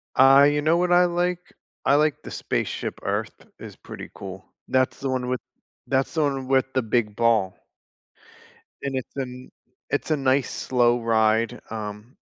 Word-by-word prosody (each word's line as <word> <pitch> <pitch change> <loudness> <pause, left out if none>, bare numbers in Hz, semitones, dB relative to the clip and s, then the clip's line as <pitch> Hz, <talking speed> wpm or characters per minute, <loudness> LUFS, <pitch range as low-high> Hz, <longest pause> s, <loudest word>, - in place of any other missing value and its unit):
I 135 +2 +7
You 145 0 +1
know 160 +2 +3
what 180 0 +1
I 175 0 +6
like? 180 0 -2 0.3
I 135 - +4
like 150 0 +1
the - - -9
Spaceship - - -3
Earth - - -3
is - - -10
pretty - - -10
cool. 95 -1 -8 0.2
That's 130 0 +1
the 135 - -3
one 130 -1 -1
with 125 0 -1 0.5
that's 135 0 0
the 160 - +2
one 135 -3 -1
with 135 0 +3
the 130 - +2
big 110 -2 0
ball 110 -5 +2 1.2
and 140 -1 -3
it's 130 - -5
a - - 0
n 125 0 -10 0.4
it's - - -2
a - - +4
nice 135 0 +1
slow 120 -1 +1
ride, 110 0 +2
um, 105 +2 -7
130 Hz, 170 wpm, -24 LUFS, 115-140 Hz, 1.2 s, I